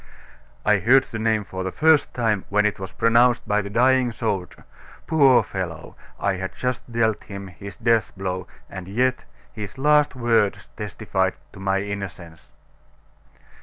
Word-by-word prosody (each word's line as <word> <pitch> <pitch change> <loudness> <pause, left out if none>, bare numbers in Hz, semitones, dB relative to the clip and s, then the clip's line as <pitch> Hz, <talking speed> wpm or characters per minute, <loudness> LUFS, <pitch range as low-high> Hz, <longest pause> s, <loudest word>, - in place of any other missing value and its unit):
"I 105 -1 +4
heard 130 +7 +5
the 115 - -4
name 110 -1 +1
for 95 -1 -5
the 95 - -3
first 155 +3 +3
time 110 -5 0
when 105 +1 +2
it 105 - 0
was 95 -1 -6
pronounced 120 +1 +3
by 105 0 +2
the 100 - -7
dying 125 +3 +3
soldier. 100 -6 -4 0.4
Poor 140 -6 +5
fellow! 85 -5 -6 0.2
I 100 -1 0
had 95 0 -5
just 125 -1 -3
dealt 115 -2 0
him 100 -1 -7
his 95 +3 -10
death 115 -2 +2
blow; 95 -1 -3 0.2
and 90 -2 -8
yet 125 +5 0 0.3
his 105 +2 -7
last 150 +1 +3
words 110 -8 +1
testified 100 -3 -2 0.2
to - - -12
my 95 0 0
innocence." 90 -6 -7
105 Hz, 155 wpm, -23 LUFS, 95-120 Hz, 0.4 s, heard